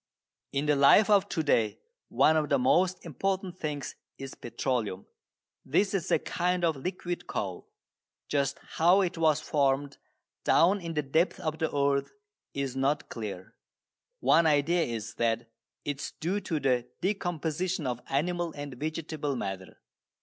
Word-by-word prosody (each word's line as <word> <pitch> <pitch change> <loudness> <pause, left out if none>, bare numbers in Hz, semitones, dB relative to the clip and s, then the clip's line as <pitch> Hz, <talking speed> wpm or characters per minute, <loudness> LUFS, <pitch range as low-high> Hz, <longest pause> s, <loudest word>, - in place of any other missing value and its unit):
In 140 +1 -1
the 150 -1 +3
life 140 +10 +6
of 200 -1 +4
to 160 - -1
day 115 -7 +2 0.3
one 160 - +4
of 150 -2 +1
the 140 - +4
most 180 +9 +2
important 185 +3 -2
things 145 -2 -4 0.2
is 135 0 -7
petroleum. 115 -5 -3 0.6
This 190 +9 +1
is 190 -5 -1
a - - +4
kind 180 0 0
of 160 -2 +2
liquid 175 +4 -4
coal. 95 -4 -4 0.6
Just 140 -1 0 0.2
how 175 +4 +6
it 180 -3 -1
was 155 -2 +2
formed 140 -1 0 0.4
down 190 +4 +4
in 165 -1 -5
the 150 - +1
depths 160 +8 +1
of 160 -3 -3
the 160 - 0
earth 140 -1 +1 0.4
is 140 -2 -2
not 140 +3 0
clear. 100 -5 -6 0.7
One 165 0 +5
idea 155 +4 +3
is 115 -1 -5
that 115 0 +2 0.4
it 145 -1 -3
is - - -5
due 180 +6 0
to 170 -5 -2
the 125 -3 +1
decomposition 175 -3 -1
of 125 -1 -2
animal 170 +4 0
and 145 -1 -6
vegetable 155 0 -3
matter. 95 -5 -6
150 Hz, 150 wpm, -29 LUFS, 135-175 Hz, 0.7 s, life